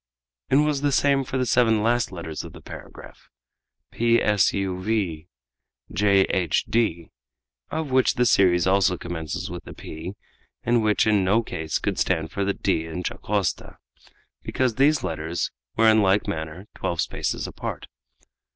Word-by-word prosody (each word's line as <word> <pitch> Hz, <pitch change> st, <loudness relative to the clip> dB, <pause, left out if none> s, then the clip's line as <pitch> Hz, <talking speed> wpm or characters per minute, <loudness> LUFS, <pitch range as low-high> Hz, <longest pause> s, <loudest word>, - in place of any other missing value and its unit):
It -, -, +3 dB
was 150 Hz, -1 st, +2 dB
the 145 Hz, -1 st, +1 dB
same 140 Hz, 0 st, +3 dB
for 130 Hz, -, -4 dB
the 130 Hz, -, +1 dB
seven 115 Hz, -3 st, +3 dB
last 120 Hz, 0 st, +1 dB
letters 80 Hz, -4 st, -6 dB
of -, -, -10 dB
the -, -, -12 dB
paragraph, -, -, -12 dB, 0.6 s
p 115 Hz, 0 st, +3 dB
s 105 Hz, -3 st, +3 dB
u 95 Hz, -2 st, -2 dB
v 95 Hz, -6 st, -1 dB, 0.7 s
j 100 Hz, -1 st, +4 dB
h 90 Hz, -4 st, 0 dB
d, 85 Hz, -8 st, 0 dB, 0.6 s
of 160 Hz, -3 st, -3 dB
which 130 Hz, 0 st, +3 dB
the 125 Hz, -, +2 dB
series 90 Hz, -5 st, +4 dB
also 95 Hz, -1 st, +3 dB
commences 80 Hz, -2 st, -5 dB
with 90 Hz, -1 st, -8 dB
a -, -, -9 dB
p, 80 Hz, +5 st, -7 dB, 0.5 s
and 120 Hz, 0 st, +2 dB
which 105 Hz, -1 st, +2 dB
in 105 Hz, -3 st, +3 dB
no 105 Hz, +5 st, +2 dB
case 80 Hz, -6 st, -3 dB
could -, -, -2 dB
stand 80 Hz, -3 st, 0 dB
for 100 Hz, -, -2 dB
the 100 Hz, 0 st, 0 dB
d 80 Hz, -4 st, 0 dB
in 90 Hz, +3 st, -5 dB
Dacosta, 100 Hz, -1 st, -2 dB, 0.6 s
because 130 Hz, -3 st, 0 dB
these 140 Hz, +5 st, +3 dB
letters 80 Hz, +1 st, -3 dB, 0.2 s
were 115 Hz, 0 st, +4 dB
in 110 Hz, 0 st, +6 dB
like 100 Hz, +1 st, +2 dB
manner 80 Hz, +1 st, -5 dB
twelve 85 Hz, -, -3 dB
spaces -, -, -2 dB
apart. -, -, -6 dB
100 Hz, 160 wpm, -24 LUFS, 85-115 Hz, 0.7 s, in